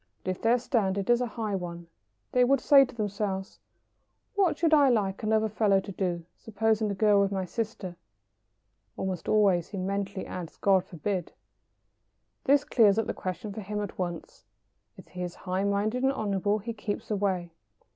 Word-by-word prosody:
But 185 - -1
if 185 - -6
their 230 +2 +4
standard 200 -5 0
is 240 +1 +4
a 250 - 0
high 220 -2 -4
one, 170 -2 -4 0.5
they 250 - +4
would 270 +2 +3
say 275 +1 +7
to 255 - -13
themselves: 200 -3 -3 0.7
"What 390 -5 +2
should 330 -2 +2
I 285 -3 +6
like 200 -5 0
another 220 0 +2
fellow 205 -2 +2
to 195 - -7
do, 175 -3 -2
supposing 220 0 0
the 200 - -2
girl 205 0 +4
were 200 -1 +3
my 190 -1 -2
sister?" 205 -3 -4 1.0
(Almost 185 -3 -3
always 195 -5 +3
he 200 - -7
mentally 195 +1 -3
adds, 175 -3 -7
"God 190 -2 +3
forbid!") 180 +1 -3 1.1
This 285 +1 +4
clears 215 -7 +4
up 225 - +1
the - - -2
question 185 +3 -5
for 215 - -6
him 210 +1 -4
at 205 -2 -5
once. 175 -3 -5 0.5
If - - -13
he 180 - -7
is 175 -1 -4
high 185 +1 0
minded 205 +5 0
and 265 +1 +3
honourable 205 -3 0
he 230 +3 -5
keeps 210 0 -5
away. 190 -4 -1
205 Hz, 175 wpm, -28 LUFS, 190-225 Hz, 1.1 s, say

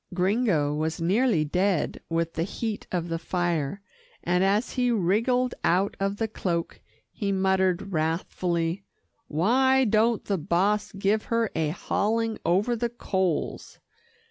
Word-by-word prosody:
Gringo 185 -6 +1
was 155 +2 -2
nearly 190 0 +2
dead 180 +2 0
with 165 0 -1
the 165 - -2
heat 210 +4 -3
of 175 -2 -1
the 165 -1 -3
fire, 175 +1 -2 0.4
and 180 +2 +2
as 205 +5 +1
he 250 -1 +1
wriggled 235 +5 +1
out 190 +4 +2
of 195 +1 -1
the 225 - -1
cloak, 175 -5 -3 0.3
he 200 -3 -2
muttered 190 0 +1
wrathfully, 165 +2 -1 0.4
"Why 260 - +3
don't 220 +1 +2
the 195 -3 -1
boss 205 +6 +1
give 200 +2 0
her 230 -2 0
a 160 -2 0
hauling 220 +6 -1
over 195 +8 +2
the 235 +1 -1
coals? 190 -7 -2
195 Hz, 135 wpm, -26 LUFS, 170-220 Hz, 0.4 s, Why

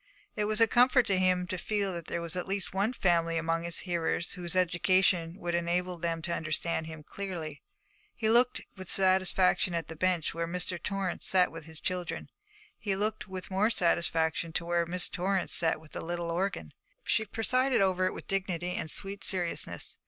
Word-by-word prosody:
It 210 - 0
was 215 +1 0
a 230 - +8
comfort 250 +2 +5
to 190 -2 +2
him 185 -1 +3
to 180 0 -4
feel 200 +1 -1
that 170 -2 -6
there 170 - -3
was 170 +1 -5
at 180 - -3
least 195 -1 -3
one 200 +4 +1
family 170 -7 +2
among 165 0 0
his 170 0 -1
hearers 170 -1 -1
whose 175 -1 -5
education 180 -1 +3
would 175 -2 -3
enable 175 +1 0
them 165 -1 -2
to 170 0 -1
understand 160 0 -1
him 160 -1 -8
clearly. 165 -5 -6 0.5
He 220 - -1
looked 240 +3 +4
with 185 -2 -7
satisfaction 185 -1 +3
at 165 - -3
the 160 - -6
bench 180 -1 +1
where 165 0 -2
Mr. 180 0 -2
Torrance 195 -2 -2
sat 185 -1 +4
with 165 -1 -9
his 160 -1 -9
children. 180 -1 -3 0.5
He 200 -3 -1
looked 215 +2 -2
with 190 0 -7
more 200 +4 +3
satisfaction 170 -4 +1
to 170 - -1
where 170 0 +1
Miss 180 +1 +2
Torrance 185 0 -1
sat 165 -2 +2
at 155 -1 -17
the - - -5
little 170 0 -3
organ. 170 - -2 0.3
She 220 - +2
presided 255 +4 +1
over 185 -1 +3
it - - -2
with - - -8
dignity 180 -3 -1
and 160 - -3
sweet 195 +3 -5
seriousness. 170 - -1
180 Hz, 190 wpm, -30 LUFS, 170-195 Hz, 0.5 s, a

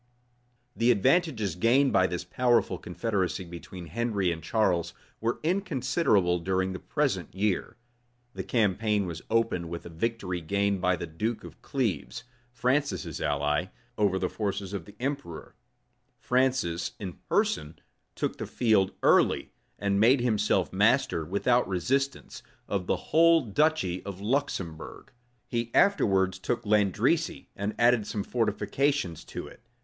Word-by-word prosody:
The 115 +1 +2
advantages 120 - +2
gained 125 - +3
by 95 - +4
this 90 -1 -4
powerful 115 -2 +1
confederacy 95 0 -2
between 85 +1 -9
Henry 100 0 -1
and 80 -1 -5
Charles, 85 -1 0 0.2
were 115 +2 -1
inconsiderable 150 - +1
during 95 +1 -1
the 95 - -6
present - - -2
year. 100 +2 -1 0.6
The - - -5
campaign 105 -2 +1
was 85 -3 -6
opened 110 -7 0
with 85 0 -6
a - - -7
victory 90 0 -3
gained 100 +3 0
by 90 0 +2
the 85 - -5
duke 105 +8 -3
of - - -12
Cleves, 115 - -2 0.3
Francis's 130 +4 -1
ally, 75 0 0 0.3
over 100 -3 +2
the 95 - 0
forces 100 -1 -3
of 95 -5 -4
the 105 - -14
emperor:[*] 130 - -4 0.7
Francis, 125 -10 0
in 95 -4 -7
person, 75 +1 0 0.4
took - - -3
the - - -4
field 105 -5 +2
early; - - +3 0.3
and 100 -1 0
made 120 +4 +5
himself 105 -3 +1
master, 80 - +2
without 100 +9 +1
resistance, 130 - -1 0.3
of 95 -3 -2
the - - +2
whole 165 +1 +4
duchy 115 - 0
of 100 -2 -7
Luxembourg: 100 - -3 0.4
he 115 -1 -2
afterwards 95 - +3
took 120 +5 -2
Landrecy, 105 -3 +1
and 100 +2 -3
added 120 -3 +3
some 105 - -3
fortifications 120 - -1
to - - -7
it. - - -14
100 Hz, 135 wpm, -28 LUFS, 90-120 Hz, 0.7 s, made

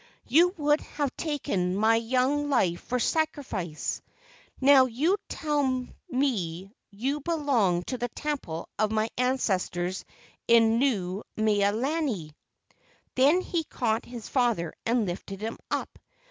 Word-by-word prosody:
You 345 +8 +4
would 295 0 +2
have 285 -3 -3
taken 195 - -1
my 220 +3 +4
young 260 +5 +1
life 185 -11 +2
for 250 - -2
sacrifice. 250 - -2 0.6
Now 270 -1 +7
you 300 - +1
tell 275 -5 0 0.2
me 195 - -1 0.2
you 255 +9 -2
belong 270 - +1
to 255 +6 -4
the 245 +1 -2
temple 260 - -4
of 215 0 +2
my 220 +1 0
ancestors 190 -8 0 0.4
in 230 -1 +5
Nuu 200 -8 0 0.2
mea 205 -2 +3
lani." 235 - -2 0.8
Then 285 +8 +4
he 340 -3 -2
caught 225 -6 -1
his 240 -2 -8
father 235 - +1
and 235 -1 +2
lifted 190 +2 -5
him 225 +1 -4
up. - - -3
240 Hz, 125 wpm, -27 LUFS, 200-285 Hz, 0.8 s, Now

